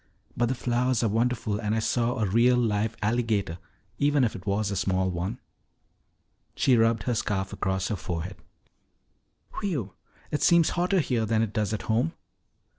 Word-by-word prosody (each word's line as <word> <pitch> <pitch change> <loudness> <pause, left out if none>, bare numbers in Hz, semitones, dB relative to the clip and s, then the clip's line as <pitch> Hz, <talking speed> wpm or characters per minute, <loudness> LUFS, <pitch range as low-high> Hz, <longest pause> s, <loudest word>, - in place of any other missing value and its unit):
But 120 - +1
the 130 - -1
flowers 120 0 0
are - - +3
wonderful 115 -1 0
and 105 -1 -1
I - - +1
saw 120 +2 0
a 110 - +1
real 120 +5 +4
live 110 -1 0
alligator, 110 -6 0 0.4
even 145 -1 +3
if 115 - 0
it 95 +1 -9
was 100 +1 0
a - - -2
small 95 0 0
one." 90 +7 -3 1.2
She 135 -3 +3
rubbed 115 0 +3
her 125 - 0
scarf 95 -4 -2
across 95 0 -1
her 110 - 0
forehead. 90 0 -5 1.2
"Whew! 140 - -2 0.4
It 150 - -1
seems 170 -2 +5
hotter 180 +1 +2
here 120 -6 0
than 110 0 +2
it 110 -2 -4
does 105 -3 0
at 110 - -3
home." 120 +9 0
115 Hz, 170 wpm, -27 LUFS, 100-125 Hz, 1.2 s, seems